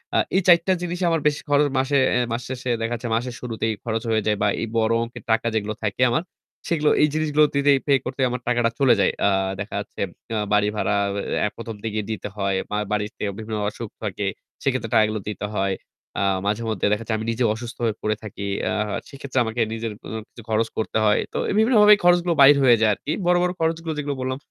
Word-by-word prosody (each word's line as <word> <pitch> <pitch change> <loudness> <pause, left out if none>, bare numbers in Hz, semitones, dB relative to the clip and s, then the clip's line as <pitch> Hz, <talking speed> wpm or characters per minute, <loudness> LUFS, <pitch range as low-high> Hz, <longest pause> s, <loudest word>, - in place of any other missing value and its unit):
আ - - +4 0.2
এই 195 - +4
৪ 170 -2 +7
টা 190 - +4
জিনিসই 175 +1 -2
আমার 165 -2 +1
বেশি 150 0 0
খরচ 145 0 +4
মাসে 135 +2 +2 0.2
এ - - +3
মাস 115 +2 -1
শেষে 130 -1 -4
দেখা 115 +1 -1
যাচ্ছে 115 0 -5
মাসের 120 +1 -2
শুরুতেই 110 -2 -2
খরচ 115 -1 -2
হয়ে 110 -1 +2
যায় 105 -1 +2
বা 105 - +3
এই 115 - -2
বড় 110 0 +2
অংকের 115 - -9
টাকা 115 +1 +2
যেগুলো 110 0 -1
থাকে 110 +4 -2
আমার 155 +8 +1 0.4
সেগুলো 155 -3 +2
এই 150 - +6
জিনিসগুলো 155 -1 +2
দিতেই 140 0 +4
pay 140 - +5
করতেই 130 0 -1
আমার 125 0 -4
টাকাটা 120 -1 +2
চলে 135 -3 +5
যায়। - - +3 0.2
আ - - +4 0.3
দেখা 100 0 -5
যাচ্ছে 100 - -7 0.3
আ - - 0 0.2
বাড়ি 105 0 +4
ভাড়া 105 -1 0 0.5
আএ 105 - +1
১ম 115 -1 -6
থেকেই 110 -1 -2
দিতে 105 -1 -4
হয়। 100 -1 0 0.4
বাড়িতে 105 0 -2
বিভিন্ন 110 0 -4
অসুখ 115 0 -7
থাকে 100 -1 -3 0.4
সেক্ষেত্রে 130 -5 -1
টাকাগুলো 110 -1 +3
দিতে 105 0 -4
হয়। 95 -1 +1 0.5
আ - - +1 0.2
মাঝেমধ্যে 110 -1 0
দেখা 105 - -2
যায় 110 - 0
আমি 110 - -5
নিজে 120 +2 -1
অসুস্থ 120 +2 -8
হয়ে 110 -2 0
পড়ে 110 0 0
থাকি। 100 -1 -6 0.2
আ - - -1 0.4
সেক্ষেত্রে 140 -1 -3
আমাকে 110 +2 -2
নিজের 115 -1 -3
অ - - -7 0.2
কিছু 115 - -13
খরচ 110 +1 +1
করতে 110 - -1
হয়। 105 - +4
তো - - -2
এই - - -1
তো - - -2
বিভিন্নভাবেই 210 -3 +6
খরচগুলো 175 0 +4
বাইর 140 +1 +8
হয়ে 120 -3 +6
যায় 110 -1 +4
আরকি। 145 - -5
বড়, 175 0 +4
বড় 180 - +1
খরচগুলো 165 0 -1
যেগুলো 145 -1 -2
বললাম 130 0 -2
115 Hz, 220 wpm, -23 LUFS, 110-145 Hz, 0.5 s, বাইর